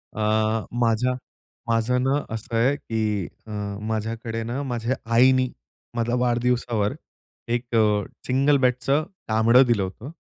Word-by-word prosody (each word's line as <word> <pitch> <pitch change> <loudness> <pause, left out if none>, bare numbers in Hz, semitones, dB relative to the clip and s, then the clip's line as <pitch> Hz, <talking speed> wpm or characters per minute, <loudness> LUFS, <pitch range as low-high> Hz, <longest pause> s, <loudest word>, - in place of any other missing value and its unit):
अ, - - -6 0.6
माझ्या 120 +2 +2 0.5
माझं 115 +2 +1
ना, 140 +2 +1
असं 115 +1 -5
आहे 125 +5 +3
की 110 - -2 0.2
अ, - - -8 0.4
माझ्याकडे 115 +1 -3
ना 120 +5 -3
माझ्या 120 -1 -2 0.2
आईनी 130 +1 +5 0.5
माझा 120 +1 0
वाढदिवसावर 120 -3 +1 0.6
एक 120 0 -2
अ, 105 -2 +3 0.2
सिंगल 135 +3 +3
बेडचं 130 +3 +2 0.2
कांबड 110 +2 +4
दिलं 115 -5 +2
होतं 105 +9 -7
120 Hz, 125 wpm, -24 LUFS, 110-125 Hz, 0.6 s, आईनी